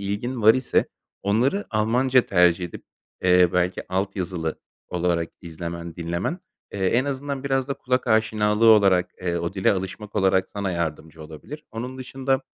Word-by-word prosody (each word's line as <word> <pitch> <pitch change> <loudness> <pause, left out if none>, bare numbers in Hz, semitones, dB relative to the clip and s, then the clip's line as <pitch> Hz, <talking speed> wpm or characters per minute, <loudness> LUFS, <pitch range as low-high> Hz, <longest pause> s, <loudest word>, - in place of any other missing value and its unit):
ilgin 105 +5 -3
var 110 +2 +7
ise 130 -1 +2 0.4
onları 125 - +1
Almanca 125 +4 +3
tercih 90 -1 +3
edip, 85 - -9 0.4
eee, 90 -1 +5
belki 90 0 0
alt 95 +2 -2
yazılı 85 -4 -3 0.3
olarak 85 -2 0
izlemen, 85 0 -6
dinlemen, 85 - -3 0.3
eee, 95 -2 -1
en 120 +6 +2
azından 140 0 -4
biraz 135 -1 0
da 140 - -1
kulak 125 0 -1
aşinalığı 110 -1 +2
olarak, 95 -5 +5
eee, 85 -1 -1
o 85 +2 -3
dile 95 -2 +2
alışmak 100 +2 -5
olarak 95 -1 +2
sana 100 -2 -3
yardımcı 80 -1 -4
olabilir. 80 - -10
Onun 125 +4 -6
dışında, 135 +1 -1
100 Hz, 155 wpm, -24 LUFS, 90-125 Hz, 0.4 s, var